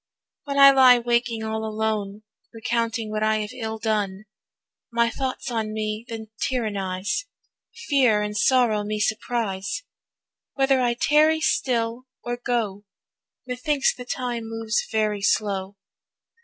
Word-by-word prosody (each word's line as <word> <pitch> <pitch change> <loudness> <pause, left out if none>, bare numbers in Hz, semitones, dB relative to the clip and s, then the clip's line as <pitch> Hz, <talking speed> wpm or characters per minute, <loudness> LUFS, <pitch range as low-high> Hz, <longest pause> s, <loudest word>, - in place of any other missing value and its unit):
When 280 -1 -3
I 275 0 +10
lie 260 -2 +7
waking 235 -1 0
all 220 0 -3
alone, 215 -1 -2 0.3
Recounting 225 -1 -2
what 215 0 -2
I 215 0 +2
have 210 0 -4
ill 220 -3 -4
done, 210 -3 -2 0.7
My 235 0 +2
thoughts 265 0 -4
on 220 -2 -2
me 215 +1 -3
then 220 -1 -7
tyrannise, 205 - -2 0.6
Fear 250 -8 +3
and 210 0 -4
sorrow 235 -3 +3
me 210 +1 -3
surprise, 215 - -2 0.7
Whether 270 -1 +3
I 240 -1 +1
tarry 305 +5 +4
still 240 -4 0 0.2
or 240 0 -2
go, 225 -5 -2 0.6
Methinks 265 +3 0
the 250 - -9
time 245 -2 -3
moves 225 -1 -1
very 215 -2 0
slow. 195 -1 0
225 Hz, 130 wpm, -24 LUFS, 215-245 Hz, 0.7 s, I